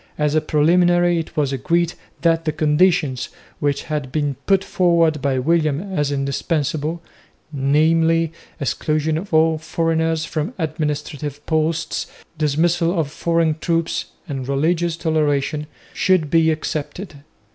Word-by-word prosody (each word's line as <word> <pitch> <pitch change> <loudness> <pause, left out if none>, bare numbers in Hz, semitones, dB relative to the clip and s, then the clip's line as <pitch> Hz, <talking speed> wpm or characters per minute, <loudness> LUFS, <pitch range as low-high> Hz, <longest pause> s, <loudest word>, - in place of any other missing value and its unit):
As 150 -1 +1
a 155 - +3
preliminary 175 +3 +3
it 165 0 -7
was 140 -2 +1
agreed 170 +6 0 0.3
that 165 -1 +2
the 155 - +1
conditions, 150 -3 +2 0.3
which 145 -1 0
had 150 -5 -4
been 145 -1 0
put 195 -1 +3
forward 170 -5 +2
by 135 -1 0
William 160 +5 0
as 145 -5 0
indispensable 150 +3 -1 0.5
namely, 160 +4 +2 0.3
exclusion 155 +3 0
of 185 +6 -5
all 160 0 +3
foreigners 160 0 0
from 165 +10 -3
administrative 150 -2 -3
posts, 160 +1 -1 0.3
dismissal 165 +3 +1
of 145 -3 -1
foreign 165 -1 0
troops, 165 -1 -1 0.2
and 135 -4 -4
religious 165 +4 0
toleration 150 -2 0 0.3
should 180 -6 +2
be 165 -1 +4
accepted. 155 +2 -4
155 Hz, 125 wpm, -20 LUFS, 150-165 Hz, 0.5 s, be